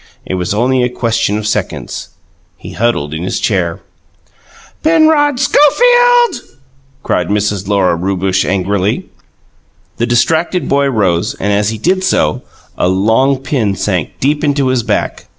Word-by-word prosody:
It -, -, -4 dB
was 90 Hz, -1 st, -2 dB
only 125 Hz, +5 st, +1 dB
a 125 Hz, -, +1 dB
question 115 Hz, -4 st, -1 dB
of 105 Hz, -, -5 dB
seconds. 105 Hz, -, -3 dB, 0.5 s
He -, -, -10 dB
huddled 100 Hz, -11 st, -1 dB
in 80 Hz, -, -4 dB
his 90 Hz, -, -2 dB
chair. 85 Hz, -5 st, -1 dB, 1.0 s
"Penrod 310 Hz, -4 st, +3 dB
Schofield!" 485 Hz, -, +4 dB, 0.6 s
cried -, -, -1 dB
Mrs. 100 Hz, -1 st, -1 dB
Lora 100 Hz, -4 st, +2 dB
Rewbush 95 Hz, +1 st, -1 dB
angrily. 100 Hz, +1 st, -1 dB, 0.9 s
The 120 Hz, -, -1 dB
distracted 160 Hz, +9 st, +1 dB
boy 140 Hz, 0 st, +2 dB
rose 100 Hz, -7 st, 0 dB
and, 105 Hz, +1 st, -1 dB
as 105 Hz, +1 st, +1 dB
he 110 Hz, -, -4 dB
did 185 Hz, -, 0 dB
so, 75 Hz, -, +1 dB, 0.4 s
a -, -, +2 dB
long 110 Hz, +9 st, +2 dB
pin 115 Hz, -9 st, -1 dB
sank 95 Hz, -5 st, -2 dB
deep 145 Hz, +3 st, 0 dB
into 140 Hz, -3 st, +1 dB
his 130 Hz, -2 st, +1 dB
back. 110 Hz, -2 st, -2 dB
110 Hz, 140 wpm, -13 LUFS, 95-145 Hz, 1.0 s, Schofield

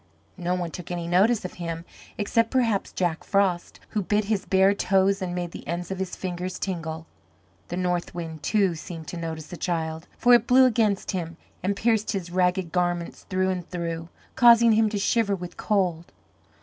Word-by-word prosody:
No 180 Hz, 0 st, -1 dB
one 175 Hz, -2 st, -3 dB
took 180 Hz, -, -8 dB
any 175 Hz, -1 st, -3 dB
notice 200 Hz, +5 st, +3 dB
of 180 Hz, -, -5 dB
him 165 Hz, 0 st, -4 dB, 0.3 s
except 230 Hz, +2 st, +1 dB
perhaps 230 Hz, -6 st, +1 dB
Jack 175 Hz, -3 st, -1 dB
Frost, 190 Hz, -3 st, 0 dB
who 210 Hz, -, -1 dB
bit 205 Hz, +2 st, +1 dB
his 205 Hz, -2 st, -1 dB
bare 190 Hz, +1 st, +4 dB
toes 195 Hz, 0 st, +2 dB
and 180 Hz, -1 st, -3 dB
made 175 Hz, -1 st, -3 dB
the -, -, -10 dB
ends 175 Hz, +2 st, -3 dB
of 190 Hz, -, -4 dB
his 190 Hz, -1 st, -3 dB
fingers 180 Hz, 0 st, -4 dB
tingle. 165 Hz, -4 st, -4 dB, 0.6 s
The 175 Hz, -, -4 dB
north 180 Hz, -1 st, -1 dB
wind, 160 Hz, -3 st, -6 dB
too, 200 Hz, -5 st, +2 dB
seemed 160 Hz, 0 st, -8 dB
to 175 Hz, -, -6 dB
notice 160 Hz, -2 st, -5 dB
the 175 Hz, -, -7 dB
child, 160 Hz, -2 st, -3 dB
for 245 Hz, -, +5 dB
it 240 Hz, -1 st, +5 dB
blew 260 Hz, +1 st, +7 dB
against 220 Hz, -5 st, +1 dB
him 170 Hz, -3 st, -4 dB, 0.2 s
and 195 Hz, +3 st, 0 dB
pierced 220 Hz, 0 st, +1 dB
his 180 Hz, -3 st, -4 dB
ragged 180 Hz, -1 st, +1 dB
garments 175 Hz, -1 st, -2 dB
through 185 Hz, 0 st, +1 dB
and 180 Hz, -2 st, -5 dB
through, 170 Hz, -1 st, -4 dB, 0.3 s
causing 235 Hz, -1 st, +7 dB
him 220 Hz, 0 st, +4 dB
to 210 Hz, -, -2 dB
shiver 205 Hz, 0 st, +2 dB
with 180 Hz, -1 st, -8 dB
cold. 180 Hz, -5 st, 0 dB
180 Hz, 190 wpm, -25 LUFS, 170-205 Hz, 0.6 s, blew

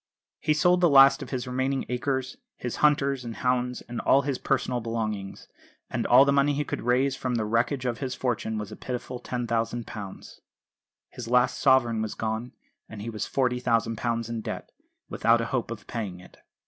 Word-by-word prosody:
He 155 Hz, -, +1 dB
sold 180 Hz, +3 st, +3 dB
the 175 Hz, -, +5 dB
last 135 Hz, 0 st, +7 dB
of -, -, -7 dB
his 130 Hz, -1 st, -3 dB
remaining 130 Hz, +1 st, -1 dB
acres, 130 Hz, +1 st, -2 dB, 0.2 s
his 125 Hz, -, -4 dB
hunters 140 Hz, -3 st, +2 dB
and 115 Hz, -2 st, -6 dB
hounds, 125 Hz, 0 st, 0 dB
and 120 Hz, -1 st, -6 dB
all 140 Hz, +1 st, +4 dB
his 135 Hz, -2 st, -2 dB
personal 125 Hz, -2 st, 0 dB
belongings; 110 Hz, -4 st, -4 dB, 0.4 s
and -, -, -1 dB
all 130 Hz, +3 st, +7 dB
the 140 Hz, -, +3 dB
money 140 Hz, +1 st, +3 dB
he 150 Hz, -, 0 dB
could -, -, -4 dB
raise 130 Hz, +3 st, +2 dB
from 130 Hz, -2 st, -2 dB
the 110 Hz, -2 st, 0 dB
wreckage 120 Hz, +5 st, 0 dB
of 120 Hz, -2 st, -1 dB
his 130 Hz, -2 st, -3 dB
fortune 115 Hz, -3 st, -2 dB
was 105 Hz, -2 st, -5 dB
a -, -, -7 dB
pitiful 125 Hz, 0 st, -5 dB
£10,000. 115 Hz, -4 st, -4 dB, 0.7 s
His 120 Hz, -2 st, -8 dB
last 125 Hz, +1 st, +2 dB
sovereign 120 Hz, -5 st, +3 dB
was 110 Hz, -1 st, -3 dB
gone, 110 Hz, +2 st, -3 dB, 0.4 s
and 105 Hz, -2 st, -8 dB
he 115 Hz, -, -4 dB
was 110 Hz, -, -4 dB
£40,000 115 Hz, -2 st, 0 dB
in 115 Hz, -1 st, -4 dB
debt, -, -, -6 dB, 0.4 s
without 115 Hz, +1 st, +3 dB
a 115 Hz, -, -1 dB
hope 125 Hz, -4 st, -1 dB
of 115 Hz, -2 st, -7 dB
paying 100 Hz, -6 st, -5 dB
it. 90 Hz, -, -16 dB
125 Hz, 185 wpm, -26 LUFS, 115-130 Hz, 0.7 s, last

